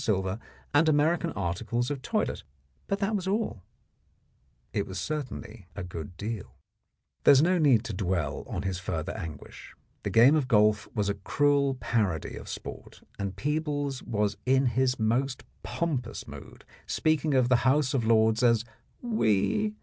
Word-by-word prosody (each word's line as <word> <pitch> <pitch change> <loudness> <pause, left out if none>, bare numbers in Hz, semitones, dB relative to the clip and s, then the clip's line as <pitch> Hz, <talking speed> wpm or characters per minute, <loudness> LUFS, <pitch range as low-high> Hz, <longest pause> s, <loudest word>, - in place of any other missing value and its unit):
silver 95 -1 0 0.3
and 155 +2 +5
American 160 +3 +2
articles 110 +7 -2
of 140 -3 -4
toilet, - - -1 0.5
but 200 - 0
that 210 +2 0
was 190 -2 -2
all. 200 - -1 1.1
It - - -2
certainly 125 - -5
was 100 - -5
a - - -7
good 85 0 -7
deal 105 -1 -5 0.7
There - - +8
is 135 - +6
no 180 +1 +3
need 135 -8 +4
to 115 - -4
dwell 90 -5 -1
on 90 - -4
his 95 -2 -2
further 90 0 -3
anguish. 80 -9 -9 0.3
The - - -3
game 120 +6 +6
of 145 -5 +1
golf 105 -3 +3
was 105 -2 0
a 100 - +1
cruel 145 -2 +2
parody 105 - -1
of - - -9
sport, - - -8 0.2
and 100 -2 -3
Peebles 145 +1 -2
was 105 -2 -1
in 135 +1 +4
his 130 +1 +1
most 120 +4 0 0.2
pompous 135 -9 -3
mood, - - -11 0.2
speaking 155 -2 +1
of 130 -2 +4
the 125 -1 +4
House 130 +3 +2
of 130 -4 +1
Lords 110 0 +3
as 115 -2 +3 0.4
"we." 210 - +1
120 Hz, 155 wpm, -28 LUFS, 105-145 Hz, 1.1 s, There